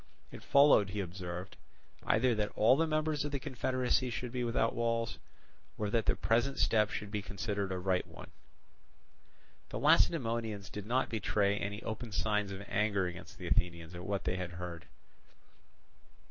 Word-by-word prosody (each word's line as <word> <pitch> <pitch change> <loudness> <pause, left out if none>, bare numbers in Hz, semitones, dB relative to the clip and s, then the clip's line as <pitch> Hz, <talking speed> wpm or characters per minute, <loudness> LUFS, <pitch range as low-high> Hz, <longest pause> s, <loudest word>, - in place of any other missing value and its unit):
It - - -9
followed, 140 -8 +5
he 105 +2 -4
observed, 90 -1 -5 0.5
either 120 +2 +3
that 105 -1 -1
all 110 +4 +5
the 165 +3 +2
members 155 -1 0
of 145 - -3
the 140 - -2
confederacy 130 0 0
should 120 +1 -4
be 125 0 -2
without 115 -1 +1
walls, 115 -1 -1 0.6
or 105 -1 -2
that 115 -1 +1
the - - +3
present 120 +8 +1
step 105 -2 +3
should 105 -2 -5
be 105 -1 -2
considered 100 -1 -3
a 95 - -1
right 90 0 0
one. - - -12 1.4
The - - -4
Lacedaemonians 115 -8 +2
did 105 0 -6
not 125 +3 +1
betray 100 -2 +1
any 105 +2 -4
open 115 +1 -5
signs 105 +1 0
of 100 +1 -7
anger 100 -1 +1
against 90 0 -7
the - - -8
Athenians 85 -1 0
at 85 0 -7
what 100 +1 -2
they 90 0 -1
heard. 90 -1 -6
105 Hz, 160 wpm, -33 LUFS, 95-120 Hz, 1.4 s, followed